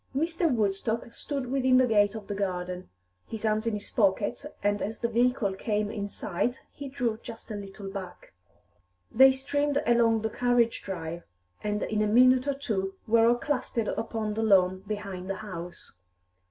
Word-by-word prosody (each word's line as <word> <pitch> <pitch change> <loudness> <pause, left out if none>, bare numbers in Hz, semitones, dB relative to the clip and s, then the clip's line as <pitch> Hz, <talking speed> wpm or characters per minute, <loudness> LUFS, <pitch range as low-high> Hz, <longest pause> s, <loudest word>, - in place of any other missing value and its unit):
Mr. 330 +3 +1
Woodstock 220 +1 -1
stood 275 -4 -4
within 260 -1 +4
the 255 - +5
gate 205 -3 +3
of 215 -2 -7
the 205 - -4
garden, 180 -2 -3 0.4
his 220 -1 -6
hands 215 +1 +1
in 225 - 0
his 205 0 -7
pockets, 205 +6 +1 0.2
and 205 0 +1
as 220 +2 -3
the 235 - -1
vehicle 235 -3 +1
came 210 +1 -1
in 205 -2 -3
sight 205 +5 -2
he 285 -1 -8
drew 240 -5 -2
just 225 -1 -9
a - - -3
little 200 0 -8
back. 190 - -8 0.8
They 265 +3 +8
streamed 285 +2 0
along 230 -2 +3
the 220 - -1
carriage 245 -1 +2
drive, 170 -3 -5 0.4
and 210 0 -1
in 215 -1 -1
a 215 - +2
minute 255 +4 +5
or 280 - +1
two 195 -8 -2
were 225 +1 +4
all 240 - +5
clustered 245 -4 -2
upon 220 -1 -2
the 220 - -2
lawn 185 -4 +4
behind 195 -3 -5
the 195 - -1
house. 175 -3 -8
220 Hz, 175 wpm, -28 LUFS, 200-245 Hz, 0.8 s, They